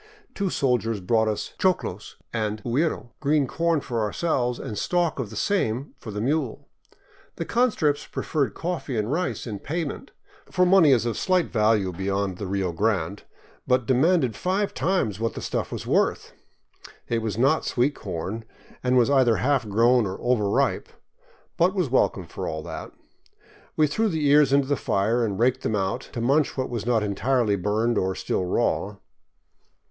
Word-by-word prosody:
Two 195 Hz, -2 st, -1 dB
soldiers 115 Hz, -, 0 dB
brought 110 Hz, +4 st, +1 dB
us 105 Hz, -1 st, -3 dB
choclos 130 Hz, -, -1 dB, 0.2 s
and 110 Hz, -2 st, -2 dB
huiro, 125 Hz, 0 st, -1 dB
— -, -, -47 dB
green 150 Hz, -1 st, +2 dB
corn 165 Hz, +3 st, 0 dB
for 120 Hz, -4 st, -3 dB
ourselves 125 Hz, +2 st, 0 dB
and 105 Hz, -, -6 dB
stalks 170 Hz, -, 0 dB
of 115 Hz, -, -5 dB
the -, -, -10 dB
same 140 Hz, -, -1 dB
for -, -, -9 dB
the 105 Hz, -1 st, -4 dB
mule. 135 Hz, +1 st, -1 dB, 0.7 s
The -, -, -4 dB
conscripts 185 Hz, -, +1 dB
preferred 145 Hz, -4 st, -2 dB
coffee 165 Hz, -7 st, -3 dB
and 105 Hz, +3 st, -1 dB
rice 180 Hz, +4 st, -2 dB
in 105 Hz, -4 st, -5 dB
payment, 155 Hz, -, -4 dB, 0.4 s
for 180 Hz, 0 st, +3 dB
money 180 Hz, -5 st, +6 dB
is 120 Hz, -3 st, +3 dB
of 115 Hz, -2 st, -2 dB
slight 185 Hz, -2 st, +1 dB
value 105 Hz, -4 st, +2 dB
beyond 95 Hz, +1 st, -2 dB
the 100 Hz, -, -4 dB
Rio 95 Hz, -1 st, -1 dB
Grande, 100 Hz, 0 st, -1 dB, 0.5 s
but 125 Hz, -2 st, +2 dB
demanded 135 Hz, -1 st, +2 dB
five 195 Hz, +3 st, -1 dB
times 165 Hz, -, 0 dB
what 115 Hz, 0 st, -2 dB
the -, -, -4 dB
stuff -, -, -3 dB
was -, -, -5 dB
worth. -, -, 0 dB, 0.7 s
It 115 Hz, -1 st, 0 dB
was 110 Hz, -2 st, -3 dB
not 135 Hz, +6 st, +3 dB
sweet 130 Hz, +4 st, +1 dB
corn, 95 Hz, -, -5 dB, 0.4 s
and 125 Hz, 0 st, +3 dB
was 125 Hz, +2 st, +4 dB
either 130 Hz, -5 st, +4 dB
half 130 Hz, -4 st, +1 dB
grown 115 Hz, +2 st, +4 dB
or 95 Hz, -, -5 dB
overripe, 110 Hz, -5 st, +1 dB, 0.7 s
but -, -, +3 dB
was -, -, 0 dB
welcome -, -, +2 dB
for -, -, -6 dB
all 80 Hz, 0 st, -4 dB
that. -, -, -7 dB, 0.8 s
We 155 Hz, -, +4 dB
threw 220 Hz, +9 st, 0 dB
the 160 Hz, -5 st, -1 dB
ears 145 Hz, -1 st, +5 dB
into 140 Hz, -1 st, +3 dB
the 145 Hz, -, +2 dB
fire 115 Hz, +1 st, 0 dB
and 100 Hz, -4 st, -1 dB
raked 125 Hz, +3 st, +2 dB
them 110 Hz, -, -1 dB
out, 100 Hz, +5 st, -2 dB
to 120 Hz, -, -3 dB
munch 140 Hz, +6 st, +2 dB
what 130 Hz, -1 st, -2 dB
was 115 Hz, -1 st, -4 dB
not 115 Hz, -3 st, +2 dB
entirely 110 Hz, +1 st, +1 dB
burned 105 Hz, +4 st, 0 dB
or 95 Hz, 0 st, -1 dB
still 90 Hz, -, -2 dB
raw. 100 Hz, +3 st, 0 dB
120 Hz, 175 wpm, -25 LUFS, 105-145 Hz, 0.8 s, money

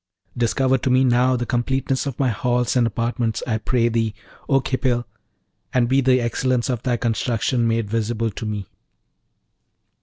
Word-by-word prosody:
Discover 130 Hz, +2 st, +1 dB
to 130 Hz, -, -1 dB
me 130 Hz, +1 st, +4 dB
now 125 Hz, 0 st, +3 dB
the 120 Hz, 0 st, -2 dB
completeness 130 Hz, +3 st, -1 dB
of 135 Hz, -, -4 dB
my 135 Hz, -2 st, +1 dB
halls 125 Hz, +3 st, 0 dB
and 120 Hz, -2 st, +3 dB
apartments, 115 Hz, 0 st, -2 dB
I 110 Hz, -3 st, -1 dB
pray 120 Hz, +2 st, +1 dB
thee, 115 Hz, -2 st, 0 dB, 0.3 s
O 135 Hz, -2 st, +4 dB
Khipil, 125 Hz, -2 st, -1 dB, 0.7 s
and 120 Hz, -2 st, +3 dB
be 135 Hz, +2 st, +3 dB
the 130 Hz, -1 st, +4 dB
excellence 125 Hz, +1 st, 0 dB
of 120 Hz, -3 st, -3 dB
thy 125 Hz, -2 st, 0 dB
construction 115 Hz, +1 st, 0 dB
made 115 Hz, -1 st, 0 dB
visible 115 Hz, +1 st, -1 dB
to 110 Hz, -, -7 dB
me!' 105 Hz, -2 st, -3 dB
120 Hz, 160 wpm, -22 LUFS, 115-130 Hz, 0.7 s, me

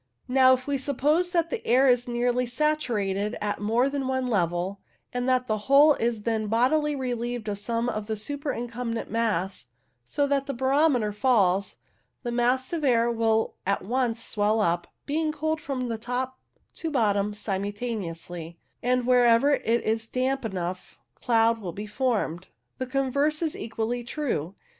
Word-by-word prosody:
Now, 260 Hz, 0 st, +6 dB
if 255 Hz, 0 st, -9 dB
we 285 Hz, -1 st, -1 dB
suppose 295 Hz, +6 st, +1 dB
that 335 Hz, -2 st, 0 dB
the 480 Hz, -, -3 dB
air 260 Hz, +3 st, +4 dB
is 245 Hz, -1 st, +3 dB
nearly 245 Hz, +1 st, 0 dB
saturated 235 Hz, -8 st, 0 dB
at 205 Hz, 0 st, -2 dB
more 230 Hz, +5 st, +2 dB
than 275 Hz, -1 st, -2 dB
one 260 Hz, -1 st, 0 dB
level, 185 Hz, -3 st, 0 dB, 0.3 s
and 245 Hz, +1 st, -1 dB
that 255 Hz, -1 st, +2 dB
the 215 Hz, -3 st, -1 dB
whole 290 Hz, +2 st, +7 dB
is 230 Hz, -4 st, -1 dB
then 220 Hz, -1 st, -1 dB
bodily 285 Hz, +7 st, +2 dB
relieved 245 Hz, -3 st, -3 dB
of 200 Hz, -1 st, -3 dB
some 230 Hz, +3 st, -1 dB
of 215 Hz, -3 st, -3 dB
the 220 Hz, -1 st, -2 dB
superincumbent 240 Hz, -2 st, -3 dB
mass, 195 Hz, -, -1 dB, 0.4 s
so 285 Hz, -, 0 dB
that 275 Hz, -1 st, 0 dB
the 275 Hz, -, -3 dB
barometer 265 Hz, -3 st, +2 dB
falls, 200 Hz, -5 st, +2 dB, 0.5 s
the 240 Hz, -, -2 dB
mass 250 Hz, +4 st, +1 dB
of 325 Hz, -3 st, -2 dB
air 235 Hz, -3 st, +3 dB
will 225 Hz, -1 st, +1 dB
at 200 Hz, +1 st, 0 dB
once 240 Hz, 0 st, 0 dB
swell 210 Hz, +1 st, +1 dB
up, 175 Hz, -4 st, +1 dB, 0.2 s
being 310 Hz, +2 st, 0 dB
cooled 315 Hz, +1 st, -2 dB
from 255 Hz, -4 st, -3 dB
top 250 Hz, +2 st, -3 dB, 0.3 s
to 325 Hz, -, -4 dB
bottom 210 Hz, -6 st, +1 dB
simultaneously, 190 Hz, -5 st, -4 dB, 0.2 s
and 250 Hz, 0 st, +1 dB
wherever 245 Hz, +2 st, +5 dB
it 235 Hz, -3 st, +1 dB
is 225 Hz, 0 st, 0 dB
damp 260 Hz, +2 st, -1 dB
enough 185 Hz, -4 st, -5 dB, 0.2 s
cloud 230 Hz, -, +2 dB
will 180 Hz, -4 st, -5 dB
be 205 Hz, +4 st, -6 dB
formed. 210 Hz, -7 st, -1 dB, 0.3 s
The 255 Hz, -, -2 dB
converse 280 Hz, +4 st, 0 dB
is 315 Hz, -, -1 dB
equally 230 Hz, +2 st, -3 dB
true. 235 Hz, -, -3 dB
240 Hz, 155 wpm, -26 LUFS, 210-265 Hz, 0.5 s, whole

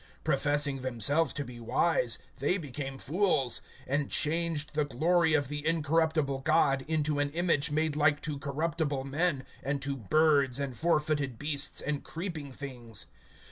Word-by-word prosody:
(22)Professing 145 Hz, -2 st, +1 dB
themselves 130 Hz, +5 st, +2 dB
to 145 Hz, -, -3 dB
be 120 Hz, -1 st, -10 dB
wise, 125 Hz, +1 st, +2 dB, 0.2 s
they 145 Hz, +8 st, +2 dB
became 135 Hz, -4 st, -5 dB
fools; 150 Hz, -, +1 dB, 0.3 s
(23)and 140 Hz, +1 st, 0 dB
changed 155 Hz, -1 st, 0 dB
the 150 Hz, 0 st, +1 dB
glory 160 Hz, +4 st, +2 dB
of 145 Hz, -3 st, +1 dB
the 145 Hz, +1 st, -4 dB
incorruptible 160 Hz, -3 st, +1 dB
God 135 Hz, -2 st, +2 dB
into 155 Hz, -2 st, 0 dB
an 145 Hz, 0 st, +1 dB
image 165 Hz, -3 st, +2 dB
made 155 Hz, 0 st, 0 dB
like 150 Hz, 0 st, +3 dB
to 150 Hz, -3 st, -3 dB
corruptible 145 Hz, 0 st, -2 dB
man, 140 Hz, 0 st, -1 dB, 0.2 s
and 140 Hz, +1 st, -2 dB
to 140 Hz, 0 st, -2 dB
birds, 140 Hz, +2 st, +3 dB
and 140 Hz, -2 st, -3 dB
fourfooted 150 Hz, -3 st, 0 dB
beasts, 145 Hz, +1 st, 0 dB
and 145 Hz, -1 st, -2 dB
creeping 165 Hz, -5 st, -6 dB
things. 125 Hz, -5 st, -6 dB
145 Hz, 145 wpm, -30 LUFS, 135-160 Hz, 0.3 s, like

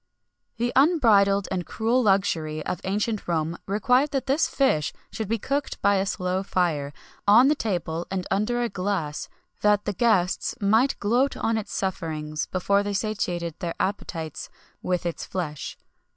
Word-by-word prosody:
[XXI -, -, -45 dB
44] 235 Hz, -, 0 dB
The 245 Hz, +2 st, +4 dB
unbridled 200 Hz, -, +4 dB
and 180 Hz, -2 st, -2 dB
cruel 230 Hz, +3 st, +1 dB
luxury 165 Hz, -7 st, +1 dB
of -, -, -3 dB
ancient 210 Hz, +2 st, -1 dB
Rome 165 Hz, -1 st, 0 dB
required 250 Hz, +8 st, +2 dB
that 270 Hz, -2 st, -2 dB
this 275 Hz, +4 st, +2 dB
fish 155 Hz, -, +1 dB, 0.2 s
should 220 Hz, -, -4 dB
be 230 Hz, +3 st, 0 dB
cooked 275 Hz, +6 st, -2 dB
by 200 Hz, 0 st, +4 dB
a 195 Hz, +1 st, 0 dB
slow 185 Hz, 0 st, -1 dB
fire, 170 Hz, -7 st, 0 dB, 0.4 s
on 235 Hz, +7 st, +7 dB
the -, -, +5 dB
table 175 Hz, -, -2 dB
and 190 Hz, -1 st, -2 dB
under 215 Hz, +5 st, +1 dB
a -, -, +1 dB
glass, 185 Hz, -7 st, -3 dB, 0.3 s
that 210 Hz, 0 st, +3 dB
the 205 Hz, -, -1 dB
guests 190 Hz, -5 st, +1 dB
might 220 Hz, +6 st, +3 dB
gloat 245 Hz, +7 st, +1 dB
on 225 Hz, -, 0 dB
its 215 Hz, -2 st, -4 dB
sufferings 155 Hz, -5 st, -3 dB
before 200 Hz, +2 st, +1 dB
they 205 Hz, 0 st, -3 dB
satiated 180 Hz, -5 st, -2 dB
their 170 Hz, -1 st, -3 dB
appetites 165 Hz, -5 st, -3 dB, 0.3 s
with 180 Hz, -1 st, -1 dB
its 170 Hz, -, -3 dB
flesh. 155 Hz, -6 st, -5 dB
200 Hz, 165 wpm, -25 LUFS, 175-225 Hz, 0.4 s, on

